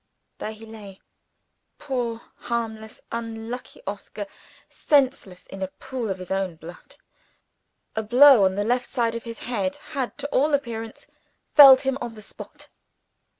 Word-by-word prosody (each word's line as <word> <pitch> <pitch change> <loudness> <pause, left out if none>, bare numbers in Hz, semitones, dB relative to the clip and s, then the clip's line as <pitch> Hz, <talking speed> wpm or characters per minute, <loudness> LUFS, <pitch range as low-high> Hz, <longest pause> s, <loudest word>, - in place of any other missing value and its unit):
There 215 - -4
he 220 +1 -12
lay 210 -3 -11 0.8
poor 245 -5 -3 0.2
harmless, 220 -2 -4
unlucky 230 +2 -6
Oscar 205 +1 -6 0.4
senseless, 260 -10 0
in 195 - -10
a 190 - -1
pool 240 +3 -6
of 190 - -2
his 185 0 -9
own 190 -3 -1
blood. 165 +2 -12 1.0
A 220 - 0
blow 245 +1 +7
on 190 0 +1
the 205 - 0
left 245 +3 0
side 235 -3 0
of 230 0 -6
his 230 -1 -7
head 200 -6 -2 0.2
had, 260 -7 -3
to - - -4
all 290 +2 +3
appearance, 225 -5 -5 0.5
felled 270 -3 +10
him 270 0 -1
on 235 -2 -5
the 215 - -11
spot. - - -11
225 Hz, 150 wpm, -24 LUFS, 205-250 Hz, 1.0 s, felled